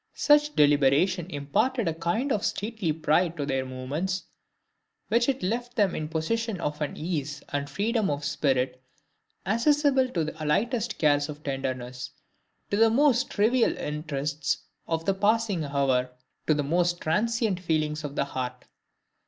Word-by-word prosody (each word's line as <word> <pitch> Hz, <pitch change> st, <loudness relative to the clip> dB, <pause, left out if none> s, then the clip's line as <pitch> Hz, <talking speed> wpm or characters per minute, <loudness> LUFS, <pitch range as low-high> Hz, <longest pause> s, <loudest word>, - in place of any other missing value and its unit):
Such 295 Hz, 0 st, +4 dB
deliberation 150 Hz, +5 st, +3 dB
imparted 180 Hz, -, 0 dB
a 165 Hz, -, +1 dB
kind 170 Hz, -, -1 dB
of 210 Hz, -, 0 dB
stately 210 Hz, -5 st, -1 dB
pride 160 Hz, +2 st, +1 dB
to 145 Hz, -, -2 dB
their 135 Hz, -2 st, -1 dB
movements, 145 Hz, +9 st, -3 dB, 0.9 s
while 230 Hz, +3 st, +3 dB
it 270 Hz, -5 st, 0 dB
left 240 Hz, +5 st, -2 dB
them 200 Hz, -5 st, +2 dB
in 155 Hz, -, -3 dB
possession 200 Hz, +6 st, -1 dB
of 150 Hz, -2 st, -3 dB
an 150 Hz, -, -3 dB
ease 150 Hz, -3 st, -3 dB
and 145 Hz, 0 st, -3 dB
freedom 220 Hz, 0 st, 0 dB
of 145 Hz, 0 st, -2 dB
spirit 130 Hz, -2 st, 0 dB, 0.6 s
accessible 265 Hz, +5 st, +3 dB
to 170 Hz, -9 st, -1 dB
the 155 Hz, 0 st, -5 dB
lightest 225 Hz, -, 0 dB
cares 145 Hz, -1 st, +2 dB
of 150 Hz, 0 st, -8 dB
tenderness, 130 Hz, -2 st, -4 dB, 0.6 s
to 200 Hz, -, +1 dB
the 225 Hz, +1 st, +6 dB
most 260 Hz, +1 st, +3 dB
trivial 230 Hz, +4 st, +2 dB
interests 150 Hz, -1 st, -2 dB, 0.2 s
of 165 Hz, 0 st, -2 dB
the 195 Hz, -, +2 dB
passing 205 Hz, -3 st, +1 dB
hour, 135 Hz, -3 st, +1 dB, 0.4 s
to 155 Hz, -, +4 dB
the 145 Hz, -, 0 dB
most 175 Hz, +4 st, +1 dB
transient 215 Hz, +3 st, 0 dB
feelings 155 Hz, -3 st, -1 dB
of 145 Hz, -1 st, -5 dB
the 140 Hz, -, +1 dB
heart. 125 Hz, -2 st, -5 dB
165 Hz, 150 wpm, -27 LUFS, 145-220 Hz, 0.9 s, the